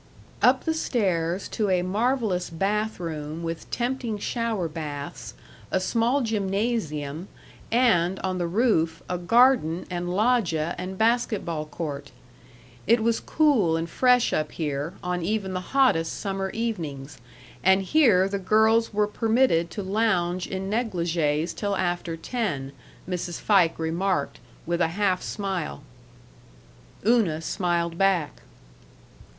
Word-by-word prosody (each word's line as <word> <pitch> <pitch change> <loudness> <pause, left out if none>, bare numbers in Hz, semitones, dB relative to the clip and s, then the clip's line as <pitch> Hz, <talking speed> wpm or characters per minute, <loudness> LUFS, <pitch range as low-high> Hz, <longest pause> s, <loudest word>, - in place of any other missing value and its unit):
Up - - +4
the 320 - +1
stairs 185 - -1
to 210 -3 -1
a 180 -1 +2
marvelous 215 -1 0
bathroom 170 -5 -3
with 165 0 -5
tempting 240 -3 -2
shower 225 -4 -2
baths, 150 -3 -6 0.3
a 190 - +1
small 235 +8 +1
gymnasium, 195 - -2 0.4
and, 195 -7 +3
on 185 -1 -2
the 175 - 0
roof, 170 -5 +1
a 180 - -2
garden 225 -4 +3
and 175 0 -3
loggia 185 -6 +1
and 185 +1 -5
basket 225 -1 +1
ball 155 -3 -3
court. 150 -3 -5 0.8
It 230 +1 +4
was 230 0 +2
cool 240 - +2
and 165 +1 -2
fresh 250 +6 +3
up 155 0 -1
here, 150 +2 -3
on 180 0 -2
even 195 +1 -2
the 185 - -2
hottest 185 -8 +1
summer 195 -1 -2
evenings, 160 - -4 0.4
and 190 +1 +4
here 205 -6 +4
the 200 0 -2
girls 220 +3 +3
were 210 0 +2
permitted 220 -5 +2
to 205 - -5
lounge 185 -3 0
in 190 0 -4
negligées 170 -7 0
till 200 -1 -1
after 175 -2 -2
ten, 165 - -3 0.4
Mrs. 180 -1 -3
Fike 185 -6 +3
remarked, 170 +4 -1 0.3
with 170 +1 -1
a 165 - +4
half 190 -3 +1
smile. 190 -8 -4 1.2
Una 215 -9 +3
smiled 170 0 -1
back. 190 -6 +1
190 Hz, 125 wpm, -25 LUFS, 165-220 Hz, 1.2 s, Up